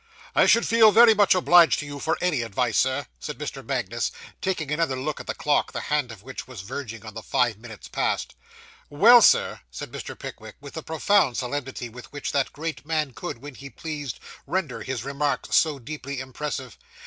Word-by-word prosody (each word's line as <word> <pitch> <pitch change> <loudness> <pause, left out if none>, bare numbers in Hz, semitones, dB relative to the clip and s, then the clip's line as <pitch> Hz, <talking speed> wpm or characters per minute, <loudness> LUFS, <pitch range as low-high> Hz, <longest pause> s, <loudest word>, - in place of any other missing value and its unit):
'I - - +5
should 230 - +5
feel 225 -1 +6
very 230 +1 +8
much 205 -3 +4
obliged 175 -2 +6
to 145 - -4
you, 145 0 -7
for 160 - 0
any 175 -8 +1
advice, 115 0 -1
Sir,' 130 +2 +1
said 150 - -6
Mr. 140 -2 -6
Magnus, 120 -3 -2 0.3
taking 165 -6 -2
another 150 -3 0
look 150 +3 -3
at - - -9
the - - -3
clock, 145 -1 +1
the - - -3
hand 145 -5 +1
of 105 -3 -12
which 130 0 -8
was 125 -7 -8
verging 115 0 -7
on 110 - -8
the 110 - -7
five 120 -3 0
minutes 110 -2 -11
past. - - -1 0.6
'Well, 225 +12 +7
sir,' - - +4
said 65 - -8
Mr. - - -7
Pickwick, 110 -1 -9
with 140 0 -11
the 160 - -5
profound 160 - +2
solemnity 130 -1 -4
with 120 +1 -12
which 145 - -4
that 140 -2 0
great 160 +2 -5
man 155 -3 -1
could, 115 +2 -7
when 145 0 -8
he 140 +2 -10
pleased, 145 0 -6 0.3
render 150 -8 -2
his 125 0 -4
remarks 140 +2 -1
so 155 -3 +3
deeply 140 +1 -6
impressive. 130 -2 -5
140 Hz, 195 wpm, -25 LUFS, 125-155 Hz, 0.6 s, very